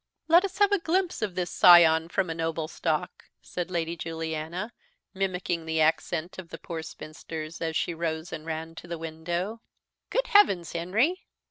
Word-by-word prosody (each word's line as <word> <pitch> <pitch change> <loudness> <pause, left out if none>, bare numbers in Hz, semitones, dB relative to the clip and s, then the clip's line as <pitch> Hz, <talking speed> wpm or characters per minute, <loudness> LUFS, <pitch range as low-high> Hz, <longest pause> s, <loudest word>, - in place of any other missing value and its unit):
"Let 340 +3 +6
us 390 -1 -4
have 410 0 +4
a 405 - +3
glimpse 350 -1 0
of 205 -4 -2
this 180 -1 -2
scion 165 -2 +7
from 185 -2 0
a - - -1
noble 160 -1 -2
stock," 155 -1 -2
said 180 0 -5
Lady 170 -2 -2
Juliana, 165 +5 -4 0.4
mimicking 180 -4 -2
the 160 0 0
accent 160 +2 0
of 175 -3 -9
the 165 - -7
poor 165 -1 -6
spinsters, 155 0 -8
as 160 -1 -2
she 170 - 0
rose 160 0 -3
and 155 -1 -6
ran 160 0 -5
to - - -9
the 170 0 -4
window. 170 +7 -4 0.5
"Good - - +1
heavens, 200 - +4
Henry! 220 - 0
170 Hz, 170 wpm, -27 LUFS, 160-190 Hz, 0.5 s, scion